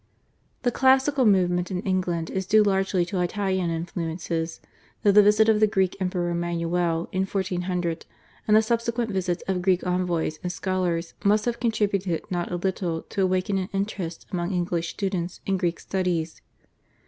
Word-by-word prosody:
The 245 - +2
classical 265 +1 +4
movement 180 -3 +2
in 185 -1 -3
England 180 -4 -1
is 190 -1 -3
due 215 +1 +5
largely 195 -2 +1
to 180 +1 -2
Italian 190 -1 0
influences, 165 0 -3 0.4
though 205 - +6
the 210 +1 +8
visit 210 +2 +5
of 220 -1 +4
the 215 - +5
Greek 190 -3 +1
Emperor 180 -2 -1
Manuel 170 0 -1
in 190 +1 0
1400, 180 -3 -2 0.4
and 215 0 +6
the 220 - +5
subsequent 235 0 -1
visits 185 -2 -1
of 190 -2 0
Greek 185 0 +2
envoys 175 -3 -1
and 180 - -3
scholars 180 -3 -2
must 210 +1 +3
have 240 -1 -1
contributed 200 -7 0
not 175 -1 -1
a - - -1
little 175 -2 -2
to 195 - -2
awaken 185 +1 +1
an 185 - -4
interest 195 -4 -3
among 175 0 -2
English 175 -1 -1
students 185 -3 -3
in 195 -1 +1
Greek 175 -2 -1
studies. 175 -4 -2
185 Hz, 160 wpm, -25 LUFS, 175-200 Hz, 0.4 s, the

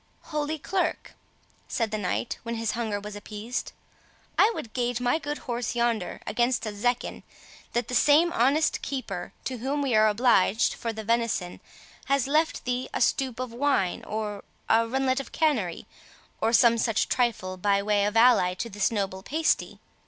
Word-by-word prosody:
"Holy 300 +1 -1
Clerk," 365 +5 -2 0.5
said 225 -3 -1
the 215 - -1
knight, 200 +4 -2
when 230 0 -4
his 225 -1 -1
hunger 225 -4 -2
was 205 0 -8
appeased, 215 +3 -5 0.6
"I 430 - +5
would 220 - -7
gage 245 -1 -1
my 250 +5 +1
good 295 -1 -4
horse 240 -2 -3
yonder 235 -5 -1
against 240 +1 0
a 215 - -4
zecchin, 245 +4 -1 0.5
that 240 -1 0
that - - -6
same 305 +7 +5
honest 285 +3 +2
keeper 220 -10 -4
to 255 -2 -4
whom 275 +5 -1
we 265 -3 0
are 215 0 +5
obliged 220 -1 +3
for 230 - -4
the 220 0 -7
venison 230 -5 -1 0.5
has 275 -2 +2
left 310 +4 +1
thee 250 0 -2
a - - 0
stoup 260 -3 +1
of 255 -2 -4
wine, 245 -8 0
or 210 -2 -4 0.2
a 230 +1 +3
runlet 260 +2 +1
of 275 - -7
canary, 235 - 0 0.6
or 225 - +2
some 235 -1 +5
such 225 -1 +1
trifle, 225 -7 0
by 200 +2 +1
way 205 -1 +2
of 210 +2 0
ally 225 -7 +5
to 230 +5 -5
this 205 0 +1
noble 195 -4 -2
pasty. 315 +10 0
235 Hz, 170 wpm, -27 LUFS, 210-260 Hz, 0.6 s, I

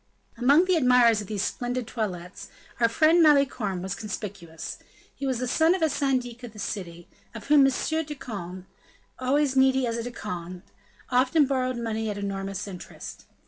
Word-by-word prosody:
Among 280 +9 +4
the 370 -2 +3
admirers 250 -5 +5
of 205 - -9
these 205 -1 -2
splendid 245 0 -2
toilettes, 180 -6 -5 0.3
our 230 -1 +4
friend 315 +8 +4
Malicorne 275 - +3
was 190 -1 -3
conspicuous; 185 -6 -6 0.3
he 275 - -4
was 260 -2 0
the 250 +1 -2
son 320 +7 +3
of 365 - -2
a 320 - +4
syndic 255 -4 -1
of 240 -3 -9
the - - -14
city, 175 -4 -5 0.3
of 225 +3 -9
whom 290 -2 +7
M. - - +2 0.3
de 295 0 -6
Conde, 185 -8 -7 0.5
always 270 +2 +1
needy 265 0 +4
as 230 -1 -2
a - - -2
De 245 - -4
Conde, 180 -5 -6 0.5
often 260 +5 +4
borrowed 255 -2 -1
money 225 -2 -2
at 205 - -4
enormous 195 0 -4
interest. 185 -3 -9
240 Hz, 175 wpm, -26 LUFS, 200-270 Hz, 0.5 s, whom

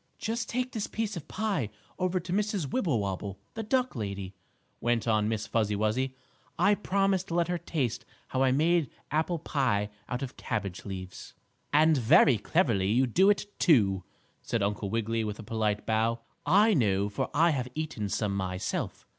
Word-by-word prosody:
"Just 225 +1 -3
take 250 +1 -1
this 220 -4 -3
piece 220 -2 -3
of 170 - -7
pie 195 - -1 0.3
over 185 0 +1
to 175 +1 -5
Mrs. 200 -8 -1
Wibblewobble, 100 - -1 0.2
the 225 - -4
duck 255 +3 0
lady," 100 -4 -4 0.5
went 120 -1 0
on 110 -1 +2
Miss 110 -1 -2
Fuzzy 105 -2 0
Wuzzy. 120 +6 0 0.4
"I 205 - +4
promised 195 -2 +1
to 165 - -3
let 170 -1 +2
her 175 -1 -1
taste 135 -11 -2 0.3
how 130 - 0
I 130 -1 +4
made 160 +1 +2 0.2
apple 160 +3 +1
pie 125 -10 0 0.2
out 125 +2 -2
of 130 - -6
cabbage 100 -5 -4
leaves." 95 -2 -7 0.4
"And 155 +1 +5
very 130 -1 +5
cleverly 115 - +1
you 125 +5 +4
do 185 - +4
it, 205 0 +2
too," 100 - +4 0.4
said - - -1
Uncle 100 0 -1
Wiggily, 115 +1 0
with 105 -1 -4
a - - -8
polite 105 -1 -1
bow. 115 +1 +1 0.3
"I 205 +7 +5
know, 100 - +2
for 100 - -3
I 165 +3 +4
have 130 -4 -1
eaten 150 -10 -3
some 100 -1 -1
myself. 95 -1 -3
130 Hz, 170 wpm, -29 LUFS, 105-175 Hz, 0.5 s, And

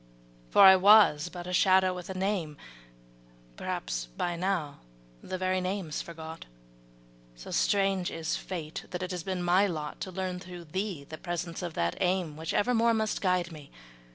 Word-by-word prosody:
For - - +6
I 190 -1 +10
was 190 -5 +6
but 175 0 -8
a 180 - -5
shadow 185 0 +4
with 180 0 -8
a 190 - -5
name, 185 -6 -2 1.0
Perhaps - - -4
by 175 -1 -1
now 170 -5 -2 0.4
the 185 - -5
very 185 0 0
name's 185 -4 -3
forgot; 160 -1 -9 0.9
So - - -10
strange 195 -2 +1
is 160 -1 -3
Fate 165 -4 -6
that 180 0 -4
it 185 - -4
has 180 -1 -3
been 185 0 -3
my 180 +3 +4
lot 155 -5 -5
To 190 - -4
learn 185 0 -3
through 180 -1 -9
thee 185 -1 -4
the 155 - -9
presence 175 -1 -4
of 175 -2 -5
that 85 0 -1
aim 180 -4 0
Which 160 +1 -4
evermore 230 +1 +2
must 220 -1 -1
guide 180 -2 +1
me. 150 -3 -11
180 Hz, 170 wpm, -29 LUFS, 160-190 Hz, 1.0 s, I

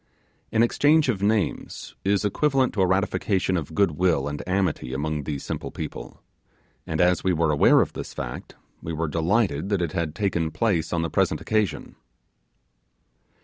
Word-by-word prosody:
An 115 0 +3
exchange 145 +4 +3
of 100 -6 -1
names 105 -1 -1
is 100 +1 +1
equivalent 135 +4 +1
to 100 - 0
a 95 - +4
ratification 95 0 0
of 80 -2 -4
good 100 -4 +3
will 80 -3 +1
and 75 0 -4
amity 90 -9 -1
among 75 0 -2
these 70 -2 -4
simple - - -4
people; - - -8 0.6
and 80 - -3
as 90 -1 +3
we 95 - +2
were 80 -2 +1
aware 75 - +5
of - - -2
this - - -6
fact, - - -7 0.3
we 80 - -5
were 80 +1 -1
delighted 85 +2 0
that 100 -2 +1
it 85 -3 -1
had 85 -3 -3
taken 85 -4 0
place 85 -1 0
on 85 -1 0
the 85 - -2
present - - +1
occasion. 110 -3 -2
90 Hz, 170 wpm, -24 LUFS, 80-100 Hz, 0.6 s, aware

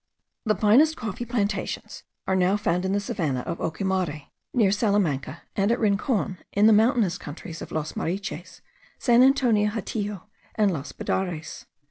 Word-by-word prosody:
The 215 -1 +2
finest 255 +11 +4
coffee 220 +2 -4
plantations 210 -4 -2 0.2
are 190 - +1
now 185 +2 +3
found 180 -3 0
in 190 - 0
the 200 - +1
savannah 160 -10 -2
of 170 +6 -5
Ocumare, 165 -3 -2 0.2
near 220 -6 +3
Salamanca, 195 - 0
and 200 +2 +2
at 240 - +1
Rincon, 200 -3 0
in 205 +1 +3
the 220 - +7
mountainous 220 - +3
countries 160 +3 -8
of - - -8
Los 155 -1 -3
Mariches, 185 0 -4 0.4
San 240 -1 +4
Antonio 245 -6 +4
Hatillo, 210 -2 -4 0.3
and 210 -2 +3
Los 145 -3 -5
Budares. 175 -4 -3
200 Hz, 150 wpm, -25 LUFS, 175-220 Hz, 0.4 s, the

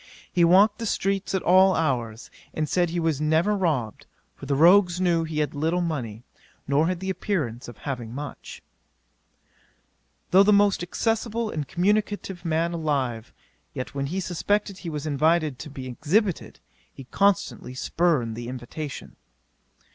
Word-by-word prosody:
He 175 - +3
walked 195 +5 +5
the 230 - -3
streets 195 -1 -1
at 190 - -1
all 185 +1 +5
hours, 120 -8 -2 0.2
and 155 -1 -1
said 175 +2 +1
he 175 +1 -2
was 160 -3 0
never 160 +7 +2
robbed, 150 - -2 0.3
for 140 - -10
the 140 - +1
rogues 175 +3 +5
knew 170 -3 +2
he 155 -1 -2
had 150 - -2
little 160 +4 0
money, 125 -10 -3 0.4
nor 145 +3 +2
had 180 0 -2
the 190 0 -2
appearance 155 - -3
of 120 - -10
having 125 -5 -5
much. 140 +2 -8 1.7
'Though 190 - +7
the 205 +1 +5
most 200 -2 +4
accessible 225 +4 -1
and 150 -3 -4
communicative 195 -1 -1
man 165 0 0
alive; 135 -8 -2 0.4
yet 130 - -5
when 140 0 -2
he 180 +6 -3
suspected 195 +2 -1
he 175 - -6
was 150 -1 -5
invited 155 -1 +1
to - - -7
be 135 -2 -8
exhibited, 165 - -1 0.3
he 135 - -11
constantly 190 -4 0
spurned 135 -6 0
the 120 0 -6
invitation. 130 +4 -7
165 Hz, 155 wpm, -25 LUFS, 140-190 Hz, 1.7 s, Though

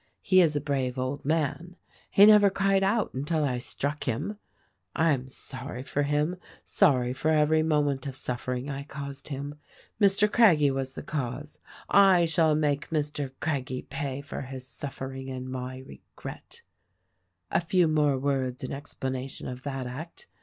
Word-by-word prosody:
He 185 -1 +5
is 160 -4 +3
a 145 - 0
brave 135 -3 -1
old 130 +2 -3
man. 165 +3 -1 0.3
He 200 - +7
never 210 -1 +7
cried 195 0 +2
out 205 +3 +1
until 150 +4 -1
I 125 -4 0
struck 145 +4 -3
him. 170 - -2 0.6
I 165 0 +3
am 130 -2 -1
sorry 130 -1 -5
for 145 - -1
him, 150 +5 0 0.3
sorry 125 -10 +3
for 150 +4 -1
every 155 0 +4
moment 145 -3 +1
of 135 - -5
suffering 125 0 -3
I 140 -1 -4
caused 140 -1 -7
him. 145 +1 -6 0.4
Mr. 200 +1 +5
Craggie 165 -12 +5
was 135 0 -3
the - - -6
cause: 145 +1 -4 0.4
/ 190 -3 +7
shall 160 -2 +4
make 150 -1 0
Mr. 150 -3 -1
Craggie 130 -5 -2
pay 135 0 -4
for 140 - -6
Jiis 130 -1 -6
suffering 135 0 -6
and 130 -1 -5
my 130 0 -5
regret. 70 - -11 0.9
"A - - +2
few 175 0 +3
words 150 -4 +2 0.4
more - - -2
in - - -4
explanation 135 -2 -5
of 125 0 -6
that 135 -2 -4
act. 145 +7 -8
145 Hz, 160 wpm, -28 LUFS, 130-160 Hz, 0.9 s, He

